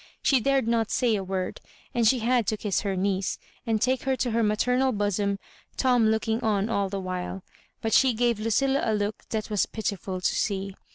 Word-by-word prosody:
She 270 Hz, -, +4 dB
dared 270 Hz, 0 st, +1 dB
not 230 Hz, -2 st, +1 dB
say 240 Hz, -4 st, +2 dB
a 195 Hz, -, -2 dB
word, 185 Hz, -1 st, -3 dB, 0.3 s
and 235 Hz, -2 st, +3 dB
she 255 Hz, -, +4 dB
had 240 Hz, -2 st, +2 dB
to 215 Hz, -, 0 dB
kiss 205 Hz, -2 st, -1 dB
her 200 Hz, -3 st, -2 dB
niece, 190 Hz, 0 st, 0 dB, 0.3 s
and 220 Hz, -1 st, +1 dB
take 255 Hz, +2 st, +1 dB
her 265 Hz, 0 st, 0 dB
to 250 Hz, -2 st, -1 dB
her 230 Hz, +1 st, +1 dB
maternal 250 Hz, +5 st, +2 dB
bosom, 205 Hz, -2 st, 0 dB, 0.4 s
Tom 245 Hz, -4 st, +3 dB
looking 220 Hz, +1 st, 0 dB
on 210 Hz, -1 st, +1 dB
all 200 Hz, -3 st, 0 dB
the 195 Hz, 0 st, -3 dB
while; 185 Hz, 0 st, -4 dB, 0.4 s
but 225 Hz, -, 0 dB
she 260 Hz, -3 st, +5 dB
gave 235 Hz, -1 st, +1 dB
Ludlla 265 Hz, +6 st, +1 dB
a 220 Hz, -, +1 dB
look 205 Hz, 0 st, -2 dB
&at 215 Hz, -1 st, -3 dB
was 210 Hz, -, +2 dB
pitiful 200 Hz, -4 st, -3 dB
to 180 Hz, -, 0 dB
see. 195 Hz, -1 st, -1 dB
220 Hz, 205 wpm, -26 LUFS, 200-240 Hz, 0.4 s, she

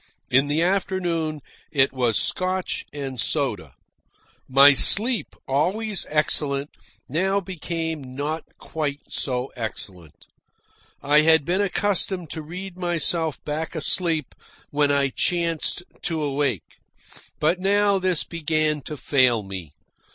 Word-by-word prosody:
In 135 Hz, +3 st, +4 dB
the 150 Hz, +3 st, +1 dB
late 170 Hz, -, +3 dB
afternoon 175 Hz, -5 st, -1 dB, 0.3 s
it 135 Hz, -3 st, +3 dB
was 120 Hz, -5 st, +1 dB
Scotch 185 Hz, 0 st, -1 dB
and 135 Hz, -3 st, -5 dB
soda. -, -, -1 dB, 0.7 s
My 140 Hz, +2 st, +8 dB
sleep, 225 Hz, -, +3 dB
always 190 Hz, +9 st, 0 dB
excellent, 145 Hz, -2 st, 0 dB, 0.4 s
now 190 Hz, +8 st, +1 dB
became 160 Hz, -7 st, -4 dB
not 150 Hz, +3 st, -2 dB
quite 145 Hz, -3 st, -4 dB
so 125 Hz, -1 st, -2 dB
excellent. 95 Hz, -, -7 dB, 0.8 s
I 145 Hz, +2 st, +5 dB
had 160 Hz, -2 st, +4 dB
been 185 Hz, +4 st, +1 dB
accustomed 190 Hz, -4 st, 0 dB
to 160 Hz, -, -3 dB
read 180 Hz, +4 st, -8 dB
myself 170 Hz, -2 st, -1 dB
back 155 Hz, +3 st, -3 dB
asleep 160 Hz, -1 st, 0 dB, 0.4 s
when 145 Hz, 0 st, +2 dB
I 140 Hz, -1 st, +2 dB
chanced 170 Hz, +3 st, -1 dB, 0.2 s
to 160 Hz, -2 st, -2 dB
awake. 140 Hz, -, -2 dB, 0.6 s
But 165 Hz, +4 st, +2 dB
now 200 Hz, +1 st, +3 dB
this 185 Hz, -3 st, +2 dB
began 155 Hz, -2 st, 0 dB
to 150 Hz, -, -6 dB
fail 130 Hz, -6 st, +3 dB
me. 95 Hz, -6 st, -7 dB
155 Hz, 120 wpm, -24 LUFS, 140-180 Hz, 0.8 s, My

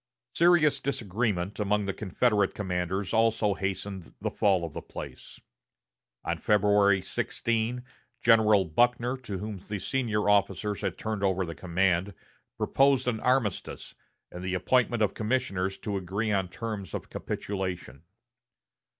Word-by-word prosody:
Serious 170 Hz, -3 st, +4 dB
disagreement 105 Hz, -6 st, -2 dB
among 105 Hz, 0 st, +1 dB
the 100 Hz, -, -2 dB
Confederate 105 Hz, +1 st, +1 dB
commanders 95 Hz, 0 st, -2 dB
also 115 Hz, -2 st, +3 dB
hastened 95 Hz, -1 st, -4 dB
the -, -, -2 dB
fall 95 Hz, -4 st, +2 dB
of 80 Hz, -, -8 dB
the -, -, -5 dB
place. -, -, -9 dB, 0.9 s
On -, -, -1 dB
February 100 Hz, -2 st, +3 dB
16, 115 Hz, +2 st, -1 dB, 0.4 s
General 110 Hz, -4 st, +5 dB
Buckner, 120 Hz, +8 st, +2 dB
to 105 Hz, -7 st, -6 dB
whom 105 Hz, +1 st, -5 dB
the 105 Hz, -, -3 dB
senior 110 Hz, -2 st, -1 dB
officers 105 Hz, 0 st, +1 dB
had -, -, -2 dB
turned 110 Hz, -2 st, -3 dB
over 95 Hz, -1 st, +1 dB
the 85 Hz, -, -6 dB
command, 90 Hz, +2 st, 0 dB, 0.4 s
proposed 135 Hz, -2 st, +3 dB
an 115 Hz, -3 st, 0 dB
armistice, 125 Hz, -6 st, -1 dB, 0.4 s
and 90 Hz, -, -8 dB
the 95 Hz, 0 st, -1 dB
appointment 120 Hz, +4 st, +2 dB
of 105 Hz, -, +1 dB
commissioners 105 Hz, -5 st, -1 dB
to 100 Hz, -2 st, -3 dB
agree 100 Hz, +4 st, -2 dB
on 95 Hz, -2 st, +1 dB
terms 105 Hz, -1 st, -5 dB
of -, -, -7 dB
capitulation. 90 Hz, -9 st, -4 dB
105 Hz, 135 wpm, -28 LUFS, 95-115 Hz, 0.9 s, General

